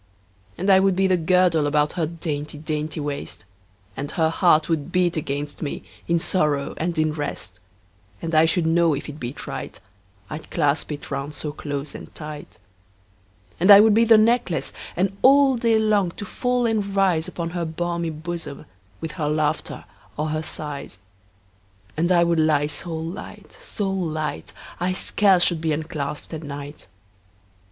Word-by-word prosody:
And 190 +3 +2
I 190 - +7
would 190 -1 +3
be 190 +1 +2
the 185 -1 +4
girdle 175 -2 +3
About 150 0 +1
her 170 -4 -1
dainty 150 -3 -5
dainty 155 0 -3
waist, 145 -1 -5 0.5
And 145 +1 -4
her 160 -1 +2
heart 160 -3 +4
would 165 0 -1
beat 180 -2 +2
against 145 -1 -4
me, 145 - -4 0.2
In 170 - +3
sorrow 150 -5 0
and 170 +1 -2
in 155 -1 +2
rest: 140 - -5 0.6
10 165 - -3
And - - -5
I 155 +1 +6
should 165 +1 +1
know 165 -1 +3
if 140 - -6
it 150 0 -8
beat 125 +3 -6
right, - - -6 0.5
I'd 155 +7 -8
clasp 150 -1 0
it 145 0 -7
round 140 +1 -4
so 150 - -3
close 145 -1 -5
and - - -10
tight. 150 -1 -8 1.0
And 185 +4 +3
I 200 -1 +12
would 215 0 +6
be 225 +2 +5
the 225 -1 +7
necklace, 215 -6 +2 0.2
And 195 +2 0
all 275 0 +6
day 230 -1 +2
long 210 -4 +2
to 205 - -7
fall 245 +4 0
and 220 -2 +1
rise 185 -5 +2
Upon 170 -1 -4
her 175 -1 -2
balmy 170 +1 -2
bosom, 160 -1 -6
15 - - -17 0.3
With 160 - -4
her 150 -3 -2
laughter 155 0 -1 0.3
or 155 +1 -1
her 155 0 -1
sighs: 150 -9 -6 1.0
And 170 +3 +1
I 175 -1 +5
would 170 -1 +2
lie 155 -2 +3
so 160 +3 -5
light, 165 +4 -7
so 205 - -3
light, 155 - -3 0.3
I 180 +1 0
scarce 190 -1 +3
should 170 -3 +2
be 160 -1 0
unclasp'd 150 -1 -4
at 160 - -5
night. 145 -3 -8
160 Hz, 175 wpm, -23 LUFS, 150-180 Hz, 1.0 s, I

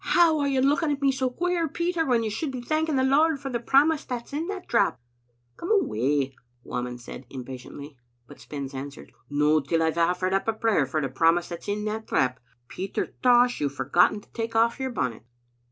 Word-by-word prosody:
how 330 -3 +5
are 285 - +1
you 270 -2 +1
looking 295 +3 +2
at 285 - -1
me 275 - +4
so 260 -1 -1
queer, 345 +5 -1
Peter, 340 +1 -1
when 240 -3 +2
you 220 - -1
should 280 +8 -3
be 255 - -5
thanking 310 +4 0
the 260 - +2
Lord 290 +3 +3
for 270 -1 -5
the 240 - -1
promise 285 +6 +3
that's 245 0 -6
in 315 +4 -2
that 390 -2 -6
drap?" 200 - +2 0.6
"Come 340 - -6
away," 140 - +1 0.3
Whamond 125 0 -4
said, 120 +1 -10
impatiently; 130 +2 -9 0.3
but - - -14
Spens 140 +2 -7
answered, 140 +1 -8 0.2
"No 150 +2 +3
till 160 +3 0
I've 160 +1 0
oflEered 180 +2 +1
up 195 - 0
a 225 - +2
prayer 220 - +1
for 155 +4 -1
the 135 - -1
promise 165 +6 +2
that's 170 -1 -8
in 210 +1 -2
that 220 +1 -4
drap. 125 0 +1 0.3
Peter 190 +8 -4
Tosh, 245 -3 +4
you've 140 -1 -1
forgotten 175 +10 +2
to - - -24
take 225 0 -4
off 230 +2 +3
your 265 0 -2
bonnet." 125 - -3
220 Hz, 205 wpm, -26 LUFS, -, 0.6 s, how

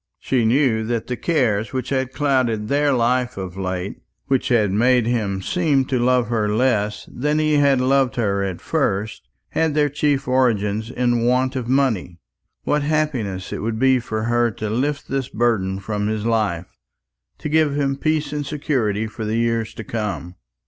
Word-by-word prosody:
She 125 -4 0
knew 115 -2 +2
that 115 0 -2
the 125 - -3
cares 120 -9 0
which 130 -1 -3
had 130 -2 -1
clouded 130 -7 0
their 145 +1 +2
life 125 -1 +1
of 95 -2 -5
late, 95 0 -4 0.3
which 135 -2 0
had 110 -5 +2
made 120 +3 +3
him 105 -5 -1
seem 150 - +1
to 130 -1 -1
love 125 -2 +2
her 110 -3 0
less 105 -2 0
than 150 +4 0
he 155 -1 +2
had 140 -2 +4
loved 130 0 +2
her 100 -5 0
at 95 -3 -4
first, 100 +3 -1 0.3
had 160 -2 0
their 150 -1 +3
chief 145 -1 0
origin 110 -5 +2 0.2
in 120 -1 +2
want 130 +2 +1
of 125 -3 -3
money. 125 -10 +1 0.5
What 150 0 +1
happiness 140 -11 -1
it - - -4
would 110 0 -2
be 130 +1 +4
for 110 -2 -4
her 120 +1 +2
to 110 -1 -5
lift 140 +5 -1
this 135 -1 -2
burden 105 -5 0
from 105 +1 -3
his 110 0 -2
life, 105 -7 -1 0.6
to - - -5
give 155 -1 +2
him 140 -1 0
peace 155 +1 -1
and 150 0 -2
security 130 -8 -1
for 110 +1 -7
the 110 +1 -1
years 115 -1 0
to 110 - -6
come! 105 -5 -4
120 Hz, 175 wpm, -21 LUFS, 105-135 Hz, 0.6 s, had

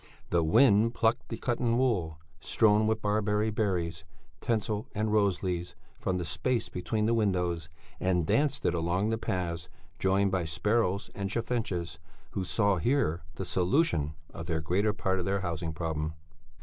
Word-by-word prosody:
It 105 +7 +4
plucked 115 +1 +1
the 115 - -4
cotton 120 -1 0
wool, 95 -12 +1 0.2
strewn 110 -1 +3
with 110 0 0
barberry 105 +1 +1
berries, 90 -7 -1 0.4
tinsel 110 -3 -1
and 105 +1 0
rose 100 -4 +2
leaves, 90 -2 -2 0.2
from 95 -1 -1
the 90 - -3
space 120 - -1
between 105 +4 -1
the 115 - +2
windows 90 -7 0 0.3
and 90 -3 +1
danced 145 - +1
it 85 - +3
along 90 +5 0
the 115 - -1
paths, 85 -5 -3 0.3
joined 95 +1 +2
by 90 -3 0
sparrows 100 +4 0
and 100 -1 -3
chaffinches 100 -8 -2 0.3
who 95 - -2
saw 95 +2 +2
here 90 - +1
the 95 - -4
solution 90 - +1 0.2
of 80 0 -7
the 80 -2 0
greater 95 +7 +1
part 95 -3 -1
of 90 - -2
their 100 0 0
housing 85 -2 -3
problem. 80 -1 -3
95 Hz, 155 wpm, -29 LUFS, 85-110 Hz, 0.4 s, It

